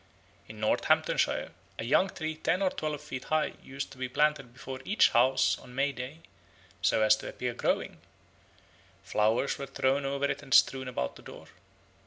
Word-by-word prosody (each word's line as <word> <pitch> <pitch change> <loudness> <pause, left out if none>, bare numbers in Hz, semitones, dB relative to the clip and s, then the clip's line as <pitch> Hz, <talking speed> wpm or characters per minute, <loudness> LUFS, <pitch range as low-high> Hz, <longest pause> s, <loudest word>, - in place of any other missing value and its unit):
In 110 0 -11
Northamptonshire 110 -5 +1 0.3
a - - -4
young 145 +11 +3
tree 160 -4 -4
ten 180 +4 0
or 185 - +2
twelve 150 -2 -4
feet 135 -3 -7
high 155 0 0
used 135 +1 -6
to 130 - -13
be 130 -1 -3
planted 145 -2 +1
before 130 +1 -8
each 210 - +4
house 130 +3 +3
on 125 0 -14
May 140 +2 +1
Day 135 +5 -8 0.6
so 110 - +3
as 110 0 +6
to - - -7
appear 125 -1 -4
growing; - - -1 1.0
flowers 110 +5 +1
were 140 - -5
thrown 135 +1 +1
over 140 +1 -1
it - - -2
and 130 - +1
strewn 130 0 +4
about 65 - -3
the - - -14
door. - - -12
135 Hz, 175 wpm, -29 LUFS, 125-150 Hz, 1.0 s, as